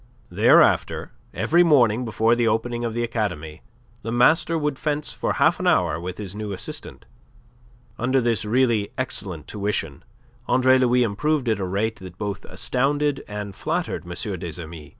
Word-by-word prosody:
Thereafter - - +3 0.2
every 170 +2 +2
morning 125 -8 +4
before 110 +1 +2
the 120 -1 +1
opening 120 +2 -1
of 115 -1 -3
the 120 - 0
academy, 90 -9 -3 0.4
the 115 - -5
master 160 +7 +3
would 150 -3 -2
fence 150 -1 -1
for - - -2
half - - +2
an - - -1
hour - - +2
with 90 +1 -6
his 100 -3 -6
new 105 0 -5
assistant. 95 - -7 0.9
Under 130 +3 +2
this 115 -5 0
really 115 -2 +1
excellent 95 -10 -3
tuition 100 -8 -3 0.4
Andre 130 0 +4
Louis 125 -1 +3
improved 130 +6 0
at 110 -2 +1
a 95 - -2
rate 105 +4 -1
that 90 -2 -11
both 100 -1 -4
astounded 145 +2 0
and 105 -1 -6
flattered 160 - -3
M. 95 +1 -4
des 85 -1 -6
Amis. 80 -2 -10
115 Hz, 160 wpm, -23 LUFS, 100-130 Hz, 0.9 s, morning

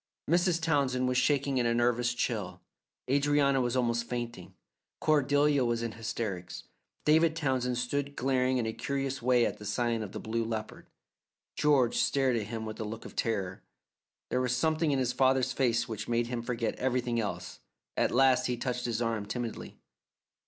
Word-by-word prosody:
Mrs. 175 +1 +2
Townsend 140 -6 +1
was 125 0 +2
shaking 140 -2 +1
in 120 - +2
a 115 - +1
nervous 120 0 +1
chill, 110 -7 -2 0.5
Adrianna 140 0 +3
was 120 0 0
almost 115 -2 +1
fainting, 120 -6 -5 0.4
Cordelia 145 -1 +3
was 120 -1 0
in 115 - -2
hysterics. 110 -5 -5 0.4
David 160 +1 +4
Townsend 130 -5 0
stood 140 +3 -2
glaring 130 0 +1
in 120 - 0
a 110 - -2
curious 135 0 -3
way 120 -1 +4
at - - -3
the - - -9
sign 115 +2 0
of 105 -3 -5
the - - -6
Blue 115 +1 -2
Leopard. 110 -1 -5 0.7
George 140 -5 +3
stared 135 -3 +2
at 110 -3 -2
him 110 0 -5
with 110 0 -7
a - - -2
look 110 +1 -6
of - - -9
horror. 95 -5 -2 0.7
There 125 - +1
was 125 -1 +1
something 160 +3 +1
in 140 - +2
his 125 -2 0
father's 130 0 +2
face 120 -3 +1
which 110 -3 -5
made 120 0 +1
him 120 0 -3
forget 115 -1 -2
everything 125 -2 0
else. 110 - -4 0.4
At - - +2
last 130 0 +4
he 125 -1 -1
touched 125 0 -3
his 120 0 -1
arm 110 -3 -2
timidly. 120 +1 -5
125 Hz, 175 wpm, -30 LUFS, 115-135 Hz, 0.7 s, David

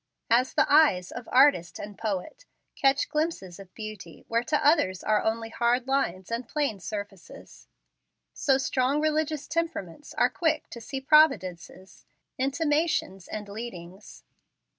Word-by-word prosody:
As 250 +3 +3
the - - +4
eyes 285 - +4
of 245 -2 -8
artist 255 -10 +4
and 205 0 -8
poet 225 - -5 0.3
catch 275 0 +2
glimpses 300 - -3
of 190 -2 -12
beauty 215 -6 -9
where 230 +1 0
to 300 +1 0
others 285 - +3
are 215 -1 +2
only 225 +1 -2
hard 240 +2 +1
lines 210 -9 -1
and 230 +1 -3
plain 285 -9 -1
surfaces, 205 -1 -9 0.7
so 270 -2 +2
strong 265 +1 0
religious 310 -1 -1
temperaments 320 - -4
are - - +4
quick 325 -3 -1
to 235 - -8
see 265 +4 -6
providences, 230 - +2 0.4
intimations, 290 - 0
and 210 -1 -6
leadings. 200 -3 -9
240 Hz, 135 wpm, -27 LUFS, 200-295 Hz, 0.7 s, the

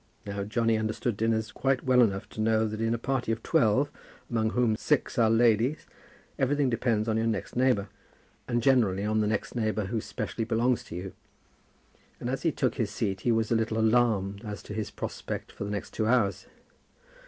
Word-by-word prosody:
Now 100 0 -3
Johnny 115 +1 +1
understood 110 +1 -1
dinners 110 0 0
quite 135 -1 0
well 130 -1 +5
enough 100 -4 +1
to 110 - -5
know 110 0 +2
that 110 +1 -5
in 115 +1 +1
a - - -2
party 125 -1 -1
of 115 0 -3
twelve, 115 +6 +2 0.4
among 110 -2 +1
whom 115 -1 +2
six 120 - 0
are 115 -2 +5
ladies, 115 +5 +3 0.5
everything 140 0 +2
depends 115 -2 0
on 110 -1 +1
your 115 0 +1
next 110 - -3
neighbour, 125 -5 +2 0.6
and 120 -1 0
generally 110 -8 +3
on 110 +1 +1
the 105 - +1
next 105 -1 -2
neighbour 110 -3 0
who 110 +3 -2
specially 115 - -4
belongs 120 +2 +1
to - - -8
you; 90 +2 -6 1.1
and - - -3
as - - -2
he - - +2
took - - 0
his - - 0
seat 95 -1 -2
he 120 - +2
was 110 -1 +1
a - - +4
little 110 0 0
alarmed 110 -3 +2
as 105 -2 -6
to - - -8
his 110 -1 -3
prospect - - -5
for - - -6
the - - -4
next 105 -1 -4
two 110 - 0
hours. 100 -6 +1
110 Hz, 200 wpm, -28 LUFS, 105-120 Hz, 1.1 s, well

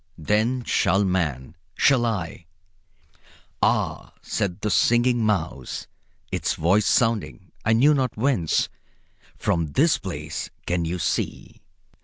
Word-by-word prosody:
Then 110 +9 0
shall 100 -3 +2
man 80 -7 -1 0.2
shall 125 -4 +3
I 90 -6 -4 0.6
" - - -36 0.5
"Ah," - - 0
said 100 0 -2
the 105 - -1
Singing 120 +3 +3
Mouse, 90 - -2 0.5
its - - -1
voice 95 +6 +2
sounding 110 - 0
I 110 - +3
knew 135 +7 +5
not 130 -6 -1
whence; 110 - +1 0.7
"from 80 -4 -1
this 160 +3 +3
place 75 -4 -5 0.2
can 90 -1 0
you 85 +2 -2
see?" - - -3
100 Hz, 120 wpm, -24 LUFS, 85-120 Hz, 0.7 s, knew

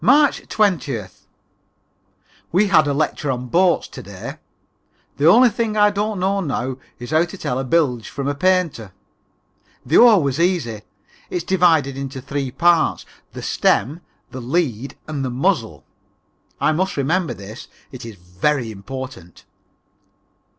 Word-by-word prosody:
March 285 - +4
20th. 140 - -1 1.2
We 195 +4 +3
had 160 -5 +5
a - - +1
lecture 150 0 -1
on 125 -1 -3
boats 180 +5 +2
to - - -9
day. - - -9 0.8
The 145 - +3
only 240 +8 +7
thing 220 -1 -2
I 210 0 +5
don't 205 0 -2
know 195 +2 +1
now 130 -5 -3 0.2
is 120 +3 -8
how 160 +2 +3
to 185 +3 -10
tell 125 -7 -2
a - - -2
bilge 130 -6 +1
from 140 0 -4
a 145 - 0
painter. 160 - 0 0.9
The 140 - +3
oar 230 -4 +7
was 140 +1 -1
easy. 170 -8 +1
It 105 -1 -10 0.4
is 175 - -3
divided 165 -7 +2
into 135 -1 -5
three 135 +1 -3
parts, 170 +5 +2 0.3
the - - -8
stem, 150 +8 +1 0.3
the 130 - -7
lead 135 -2 -2
and 150 -3 -3
the 130 - -2
muzzle. 130 - -1 0.7
I - - +2
must 185 +3 -1
remember 165 +5 0
this, 100 +4 -10 0.2
it 130 -2 -9
is 115 -2 -8
very 105 +8 -2
important. 110 -3 -9
145 Hz, 150 wpm, -20 LUFS, 125-180 Hz, 1.2 s, only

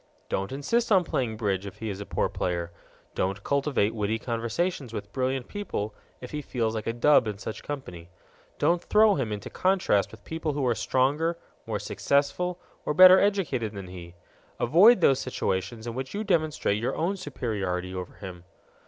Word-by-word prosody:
Don't 95 +3 -2
insist 220 - 0
on 190 -3 +6
playing 120 -8 -2
bridge 100 -3 -1
if 100 - -9
he 110 -2 -4
a 100 +1 -6
poor - - 0
player; 85 -1 -3 0.4
don't 95 +2 -2
cultivate 140 -6 +1
witty 110 0 -1
conversations 120 +4 -2
with 105 -2 -6
brilliant 130 -1 -1
people 145 - -4 0.3
if 125 - -8
he 150 - -3
feels 115 -5 -2
like 110 -1 -4
a - - +2
dub 120 0 +4
in 105 -2 -3
such 110 +1 -6
company; 90 -13 -7 0.5
don't 170 +3 +2
throw 215 0 +5
him 130 - -2
into 105 -2 -5
contrast 185 - +2
with 110 -2 -14
people 160 -2 -3
who 140 -2 -1
are 120 - +3
stronger, 140 +9 +1 0.3
more - - -1
successful, 175 +6 0 0.2
or 150 - -2
better 185 +2 +10
educated 160 - 0
than 95 -3 -7
he; 85 -1 -10 0.4
avoid 185 - +6
those 135 -5 +5
situations 105 -2 -2
in 120 - -4
which 130 +7 -5
you 210 - -2
demonstrate 155 - +1
your 120 - -1
own 180 +5 0
superiority 100 - -3
over 90 -1 -6
him. 90 -3 -9
125 Hz, 175 wpm, -27 LUFS, 100-155 Hz, 0.5 s, better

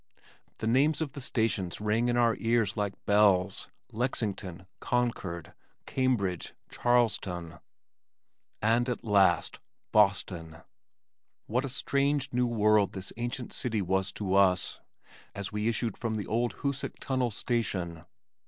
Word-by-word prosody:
The - - -4
names 135 +7 +3
of 155 -4 -2
the 140 - -8
stations 110 -8 0
rang 105 +3 +1
in 120 0 +1
our 115 -2 +4
ears 115 -4 +1
like 100 -2 -2
bells, 100 -2 +3 0.2
Lexington, 100 -6 -2
Concord, 100 -9 -2 0.3
Cambridge, 115 -10 0 0.2
Charlestown, 100 -9 0 1.0
and 120 +3 +3
at 125 - -3
last 100 -5 +3 0.3
Boston! 90 -5 +1 0.8
What 125 +5 0
a - - -4
strange, 140 +1 0
new 125 0 +2
world 105 -3 +3
this 95 -1 -5
ancient 120 +1 -4
city 110 -5 -1
was 95 +1 0
to 95 -3 -2
us, 95 -2 +3 0.6
as 100 -1 -5
we 105 +1 -1
issued 115 -1 0
from 115 -2 -2
the 105 - -3
old 120 +2 0
Hoosac 140 -1 -2
Tunnel 130 -2 0
station! 95 -8 -2
110 Hz, 125 wpm, -29 LUFS, 95-120 Hz, 1.0 s, our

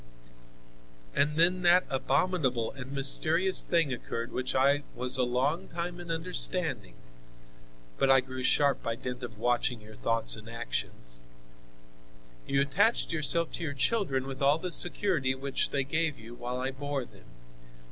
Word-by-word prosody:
"And 150 - +1
then 180 +2 +4
that 180 +1 +5
abominable 130 -3 0
and 135 -1 -9
mysterious 160 +7 +4
thing 165 -6 +1
occurred 115 -1 -5
which 130 0 -2
I 140 +2 +3
was 125 0 +2
a 130 - +3
long 130 +6 -1
time 175 +1 -5
in 175 -1 -10
understanding 165 - 0 1.0
(but 135 - +2
I 135 0 +7
grew 130 0 -8
sharp 140 +2 +2
by 115 - -3
dint 125 +1 -6
of 115 -3 -8
watching 120 +2 0
your 110 0 -14
thoughts 115 +1 0
and 110 +1 -12
actions): - - -5 1.3
You 140 0 +1
attached 200 +12 +2
yourself 165 +1 +2
to - - -5
your 145 -3 -4
children 140 - 0
with 135 0 -7
all 140 +2 +4
the 180 +2 -5
security 170 -7 +2
which 135 +1 -2
they 140 -1 0
gave 155 +2 -1
you 110 +2 -12
while 125 +1 -5
I 130 +1 -2
bore 140 -1 -4
them. - - -19
135 Hz, 155 wpm, -29 LUFS, 125-165 Hz, 1.3 s, I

